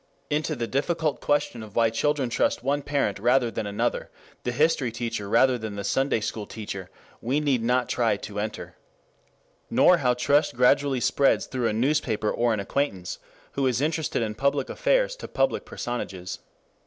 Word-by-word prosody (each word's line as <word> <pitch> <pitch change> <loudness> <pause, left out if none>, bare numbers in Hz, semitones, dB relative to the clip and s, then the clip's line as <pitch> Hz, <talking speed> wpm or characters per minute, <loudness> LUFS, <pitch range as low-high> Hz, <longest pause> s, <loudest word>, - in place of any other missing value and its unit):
Into 155 +1 0
the 120 -3 -2
difficult 150 +4 -1
question 145 -5 0
of 105 -2 -11
why 115 -1 +3
children 135 +1 0
trust - - +1
one 140 +2 +1
parent 140 -8 -1
rather 120 +2 +3
than 105 - -3
another, 100 0 -1 0.3
the 120 - -1
history 140 -2 +2
teacher 115 -3 -4
rather 130 +2 +4
than 110 -2 -5
the 100 - -4
Sunday 135 +3 +1
school 110 -1 -4
teacher, 100 -4 -7 0.3
we 130 +6 0
need 140 -5 +1
not 125 +1 +1
try 115 -4 +1
to 105 0 -6
enter. 105 +1 -5 0.9
Nor 180 - +5
how 125 -2 +2
trust 140 +2 +2
gradually 130 +1 +3
spreads 140 +3 +2
through 125 -3 -1
a - - 0
newspaper 115 -3 +1
or 120 0 +1
an 110 - 0
acquaintance 100 -4 -2 0.3
who 135 -1 0
is 125 -2 +1
interested 155 -4 0
in 110 -1 -2
public 140 +4 0
affairs - - +1
to - - -7
public - - 0
personages. 95 -7 -5
125 Hz, 170 wpm, -26 LUFS, 110-145 Hz, 0.9 s, Nor